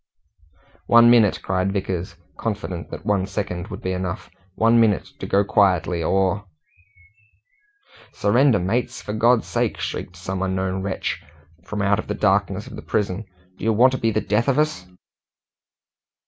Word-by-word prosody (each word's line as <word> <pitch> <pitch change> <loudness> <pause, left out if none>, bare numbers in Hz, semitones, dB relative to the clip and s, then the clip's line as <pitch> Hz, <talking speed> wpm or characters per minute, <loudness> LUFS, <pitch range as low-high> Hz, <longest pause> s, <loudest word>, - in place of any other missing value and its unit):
"One 120 0 +7
minute!" 110 -5 +4
cried 95 0 0
Vickers, 95 -3 -3 0.2
confident 95 -6 -4
that 80 - -8
one 100 -3 +1
second 95 -3 -4
would 100 - -8
be 95 - -1
enough 95 -1 -4 0.2
"one 115 +1 +4
minute 110 -4 +2
to - - -5
go 100 +1 +3
quietly, 90 -4 +2
or 95 +4 +1 0.8
" 420 - -29
"Surrender, 120 +3 +3
mates, 105 +7 -1
for 105 - -6
God's 115 +2 +3
sake!" - - -1
shrieked 90 - -5
some 95 +1 -5
unknown 95 0 -1
wretch 95 0 -3 0.4
from 105 0 -3
out 100 +1 +2
of - - -5
the - - -2
darkness 100 0 +1
of - - -10
the - - -8
prison. 105 0 -2 0.3
"Do - - -10
you 110 +1 +2
want 125 +5 +5
to 130 - -3
be 115 - +1
the 110 0 0
death 105 +5 0
of 135 -1 +2
us?" 150 -12 0
100 Hz, 160 wpm, -22 LUFS, 95-115 Hz, 0.8 s, One